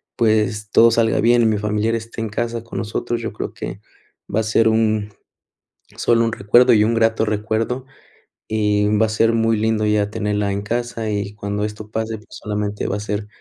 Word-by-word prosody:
pues, 105 -3 +1
todo 115 0 +6
salga 115 0 +2
bien 120 +1 +4
y - - +3
mi 110 -1 +1
familiar 105 +2 0
esté 115 0 -6
en 110 - -3
casa 115 +2 -3
con 115 - -8
nosotros, 120 +2 -3
yo 115 - -4
creo - - -5
que 100 - -7 0.5
va 105 - +2
a - - -2
ser 110 +1 +2
un 110 -2 +1 0.9
sólo 115 -1 +2
un 115 - -1
recuerdo 120 +5 +4
y 105 - +4
un 115 +2 +1
grato 115 -1 +2
recuerdo, 110 +4 -2 0.6
y 105 -1 +1
va 110 +1 +3
a - - -5
ser 115 +1 +2
muy 115 -1 +2
lindo 110 0 +1
ya 105 -1 +1
tenerla 105 -1 -1
en 100 - -2
casa 115 0 -3
y 100 -1 -3
cuando 105 0 -3
esto 105 0 -7
pase, 110 0 -3
pues, 105 - -18
solamente 105 -1 -4
va 100 - -1
a - - -5
ser 105 0 -3
110 Hz, 200 wpm, -20 LUFS, 105-115 Hz, 0.9 s, todo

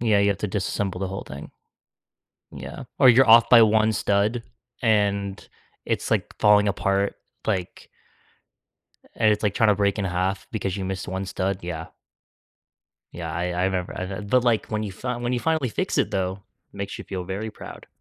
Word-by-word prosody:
Yeah, 110 -3 +3
you've 100 -1 +2
to 105 - -2
disassemble 95 -1 -2
the 95 - -2
whole 95 +1 -6
thing. 70 +2 -9 1.0
Yeah, - - -8
or 130 - +7
you're 130 +2 +6
off 115 +1 +8
by 120 -2 +8
one 110 0 +4
stud 105 +4 +1 0.4
and 100 -3 +1 0.4
it's - - -2
like - - 0
falling 105 0 +5
apart 100 0 0 0.3
like 95 -5 -3 1.3
and 110 -2 +3
it's 105 - -1
like 105 -2 +1
trying 110 - +3
to 105 - +4
break 100 +1 +1
in 100 - -1
half 95 +2 -2
because 100 -4 -2
you 95 - -3
missed 95 -1 -4
one 95 +1 -3
stud, 95 +1 -2
yeah. 80 -2 -5 1.3
Yeah, 85 -2 -5
I 85 +1 -1
I 90 +1 -1
remember 95 -2 -2
I'd 95 +2 -5
but 125 +1 +3
like 120 -3 +1
when 110 -1 -2
you 105 - -4
fin 120 +5 -4
when 120 - 0
you 125 - 0
finally 160 -3 0
fix - - -2
it - - +1
though, 95 +1 -2 0.3
makes 100 +5 -5
you - - -6
feel 95 -2 -5
very 100 +4 -4
proud. - - -11
100 Hz, 185 wpm, -24 LUFS, 95-110 Hz, 1.3 s, off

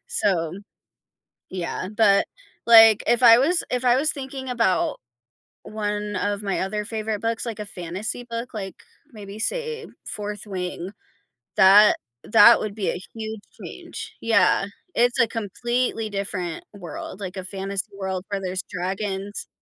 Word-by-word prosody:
so, 180 - +1 1.0
yeah, 185 0 -4
but 200 -3 +4 0.4
like, 225 -2 +8
if 240 +1 +3
I 230 -1 +9
was 330 +7 +3
if 250 0 -1
I 245 0 +5
was 305 +3 +3
thinking 265 -1 -7
about 230 -7 +1 0.7
one 210 -1 -3
of 205 +2 -1
my 195 -1 -1
other 210 +2 -2
favorite 220 -1 -3
books, 230 0 -1
like, 225 -3 -5
a 210 - -5
fantasy 190 +6 -4
book, 230 +1 -5
like, 195 -4 -6 0.4
maybe 205 -1 -10
say, 460 - -2 0.2
Fourth 210 0 -5
Wing, 185 -1 -5 0.7
that 200 +3 +7 0.3
that 230 +1 +7
would 210 -2 -4
be 205 -4 -1
a 180 - -6
huge 220 -1 -6 0.2
change - - -9
Yeah, 225 -3 +3 0.3
it's 240 +1 +2
a 230 - +5
completely 225 +1 -2
different 195 -4 -4
world, 180 0 -8
like, 185 -2 -6
a 185 - -4
fantasy 195 0 -4
world 190 -1 -3
where 200 -1 -2
there's 185 -1 -3
dragons 195 +2 -4
210 Hz, 145 wpm, -23 LUFS, 195-230 Hz, 1.0 s, I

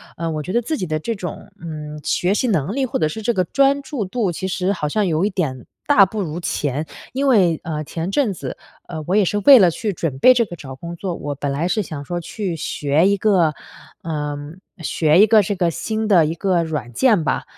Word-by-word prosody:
呃， 165 0 -3
我 155 -1 -3
觉 185 - -5
得 240 - +2
自 310 +7 -3
己 185 - -3
的 155 - -1
这 230 +9 -3
种， 180 -5 -7
嗯， 150 -2 -7
学 180 +2 +1
习 250 - 0
能 190 - 0
力， 270 -1 +1
或 255 - -2
者 155 - +2
是 220 - -6
这 235 +3 0
个 185 - +1
专 275 +8 +2
注 275 -6 -4
度， 195 0 -1
其 190 +3 -4
实 185 +1 -1
好 160 -7 -2
像 210 +7 0
有 165 +2 +1
一 - - +1
点 150 - -3 0.2
大 225 -9 +6
不 210 +3 -4
如 165 -2 -4
前。 150 -3 -2 0.3
因 275 +2 0
为， 185 - +4
呃， 155 -2 -3
前 165 +4 -4
阵 255 -2 +1
子， - - -7 0.3
呃， 160 -3 -6
我 185 - +1
也 210 - +4
是 205 +3 0
为 265 +5 +8
了 185 -4 +6
去 210 +5 -3
准 165 -7 -3
备 255 - +7
这 240 -2 +2
个 175 - -9
找 135 -5 -9
工 170 +5 -8
作， 180 0 -4
我 145 -2 -5
本 140 0 -3
来 150 +5 -1
是 215 +4 0
想 150 -5 -7
说 175 +4 -3
去 185 0 -4
学 150 +2 +1
一 200 - +2
个 185 -7 +3 0.5
呃， 150 -3 -3 0.4
学 160 -1 +2
一 215 - +7
个 220 0 +6
这 200 +1 -2
个 180 -2 +1
新 220 +5 -3
的 180 -6 +5
1 160 +2 -2
个 180 -1 +1
软 150 -7 -4
件 215 - +3
吧， - - -1
175 Hz, 255 characters per minute, -20 LUFS, 155-210 Hz, 0.5 s, 为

